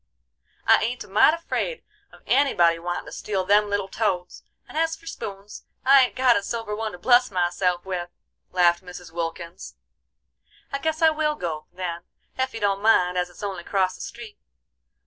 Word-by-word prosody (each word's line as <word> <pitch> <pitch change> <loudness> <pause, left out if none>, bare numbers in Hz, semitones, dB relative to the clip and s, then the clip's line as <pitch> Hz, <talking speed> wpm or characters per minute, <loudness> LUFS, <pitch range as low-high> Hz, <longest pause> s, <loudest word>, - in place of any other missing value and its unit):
"I - - +5
ain't 245 +4 -2
a - - -15
mite 300 +10 +5
afraid 405 +8 -3 0.3
of - - -18
anybody 175 -12 +3
wantin' 175 +1 -4
to - - -10
steal 195 -3 -3
them 205 +2 +4
little 200 -1 -1
toads; 185 -4 -2 0.3
and - - -13
as 325 +1 +1
for 330 - -20
spoons, 200 -9 -8 0.2
I 275 +1 +8
ain't 250 - -2
got 255 -2 +4
a - - +1
silver 220 0 -4
one 220 0 -4
to - - -8
bless 245 +6 +4
myself 180 -1 0
with," 180 -2 -4 0.4
laughed 175 0 +3
Mrs. 180 -2 -10
Wilkins. 170 +1 -6 1.0
"I 275 - -2
guess 315 +2 -1
I 320 - +7
will 305 -1 0
go, 160 - -5
then, 175 -2 -4 0.3
ef 260 0 -1
you - - -4
don't 200 -1 0
mind, 180 -5 +4
as 180 0 0
it's 180 - -13
only 195 -3 -3
acrost 185 0 0
the - - -10
street. 235 -3 -9
200 Hz, 185 wpm, -24 LUFS, 180-250 Hz, 1.0 s, I